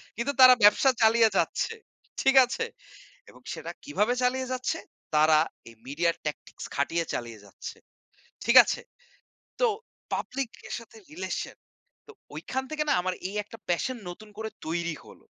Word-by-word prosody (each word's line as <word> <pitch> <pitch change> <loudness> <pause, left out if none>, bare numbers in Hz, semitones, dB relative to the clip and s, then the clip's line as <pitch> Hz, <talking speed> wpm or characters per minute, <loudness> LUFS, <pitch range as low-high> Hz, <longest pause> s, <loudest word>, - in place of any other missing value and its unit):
কিন্তু 265 +6 -2
তারা 255 0 +11
ব্যবসা 210 +6 +6
চালিয়ে 225 0 +6
যাচ্ছে, 455 - 0 0.5
ঠিক 270 0 +3
আছে? 265 - -3 0.6
এবং - - -17
সেটা - - -6
কিভাবে 245 -5 +1
চালিয়ে 255 +1 0
যাচ্ছে? 255 +5 -1 0.4
তারা 155 0 +5 0.3
এই 115 - -16
মিডিয়া 165 +5 +1
ট্যাকটিক্স 150 - -6
খাটিয়ে 165 +4 0
চালিয়ে 115 -2 -5
যাচ্ছে, 100 - -9 0.7
ঠিক 235 +3 +3
আছে? - - -2 0.8
তো - - +4 0.5
পাবলিক 260 -2 -3 0.2
এর - - -6
সাথে 230 -1 -15
রিলেশন 185 +4 -4 0.5
তো - - -11 0.2
ওইখান 250 +12 -3
থেকে 305 -1 -1
না - - +4
আমার 185 +1 -1
এই 200 - -8
একটা 215 +2 -12
প্যাশন 245 +9 0
নতুন 210 +5 -10
করে 220 0 -4 0.2
তৈরি 170 0 -2
হল। - - -15
220 Hz, 150 wpm, -27 LUFS, 170-255 Hz, 0.8 s, তারা